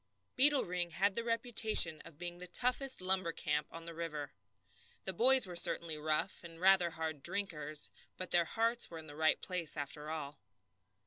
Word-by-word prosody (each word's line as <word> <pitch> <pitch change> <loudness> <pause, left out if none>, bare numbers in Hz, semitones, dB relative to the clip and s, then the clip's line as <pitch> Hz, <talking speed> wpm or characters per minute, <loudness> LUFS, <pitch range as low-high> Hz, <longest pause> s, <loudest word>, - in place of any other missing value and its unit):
Beetle 285 +1 +5
Ring 175 -1 -3
had 195 +4 0
the 235 - -3
reputation 225 -8 +4
of 155 - -13
being 175 +1 -8
the 180 - -8
toughest 250 +5 0
lumber 185 -2 -1
camp 150 -2 -3
on 165 0 -10
the 170 - -8
river. 150 -5 -6 0.7
The 190 - -4
boys 260 +7 +4
were 180 -2 -9
certainly 170 -1 +3
rough, 155 +5 -3
and 165 -1 -12
rather 185 -1 +4
hard 160 -2 -5
drinkers, 155 -6 -3 0.3
but 185 - -7
their 170 -1 +2
hearts 230 +5 0
were 165 - -9
in 160 - -10
the 145 -1 -10
right 155 0 +1
place, 180 -4 -4
after 150 +1 -6
all. 150 -2 -6
170 Hz, 180 wpm, -33 LUFS, 155-195 Hz, 0.7 s, Beetle